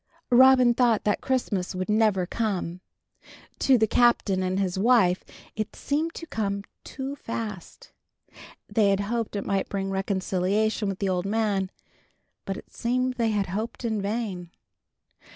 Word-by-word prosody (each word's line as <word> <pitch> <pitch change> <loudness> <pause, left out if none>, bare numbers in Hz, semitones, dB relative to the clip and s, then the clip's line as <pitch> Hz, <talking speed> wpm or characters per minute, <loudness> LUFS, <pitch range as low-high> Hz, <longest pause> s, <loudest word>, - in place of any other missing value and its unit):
VI. 240 - +6
Robin 255 -2 +7
thought 235 -3 +2
that 210 - 0
Christmas 205 -9 -1
would 185 0 -3
never 210 -4 +2
come. 185 -4 -2 0.8
To 265 -2 +4
the 220 - +3
Captain 220 -5 +3
and 185 +1 -1
his 190 -1 -1
wife 200 -5 +4 0.3
it 215 -1 -4
seemed 315 +4 -2
to 330 - -7
come 200 -8 -2 0.2
too 270 +1 -6
fast. 225 - -7 0.8
They 210 -3 +2
had 195 0 +2
hoped 225 +1 -2
it 200 - -3
might 195 -1 -1
bring 195 -1 -2
reconciliation 195 +2 0
with 195 - -3
the 195 -1 -1
old 180 0 -1
man, 205 -3 0 0.8
but 195 0 -3
it - - -13
seemed 255 +2 0
they 230 -2 +1
had 205 -3 0
hoped 220 +6 -4
in 220 -3 -1
vain. 200 -4 -3
210 Hz, 150 wpm, -26 LUFS, 195-235 Hz, 0.8 s, Robin